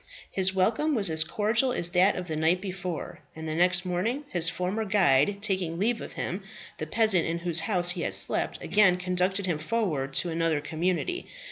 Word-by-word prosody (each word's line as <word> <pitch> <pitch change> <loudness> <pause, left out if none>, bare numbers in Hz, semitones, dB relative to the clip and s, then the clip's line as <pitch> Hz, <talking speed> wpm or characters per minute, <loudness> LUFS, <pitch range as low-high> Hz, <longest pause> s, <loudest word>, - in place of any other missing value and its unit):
His 190 -1 +1
welcome 230 +11 +1
was 200 -7 -1
as 155 0 +1
cordial 220 +9 0
as 175 -7 -1
that 185 +3 +3
of 180 -1 -6
the 160 - -4
night 160 +4 +1
before; 185 -3 -6 0.2
and 160 0 -7
the 155 - -3
next 180 +2 +2
morning, 205 +11 -2
his 175 -1 +2
former 180 +5 -3
guide 190 -4 +2
taking 185 -5 0
leave 225 +5 0
of - - -9
him, 185 +4 -4 0.4
the 155 - -4
peasant 215 -2 +3
in 165 +1 -2
whose 170 -1 -1
house 175 -1 +1
he 180 -1 -4
had - - 0
slept, - - +5
again 195 -4 +3
conducted 180 +2 -1
him 170 -5 -2
forward 155 -8 -2
to 175 - +2
another 165 -2 0
community. 180 - -3
180 Hz, 195 wpm, -26 LUFS, 165-205 Hz, 0.4 s, slept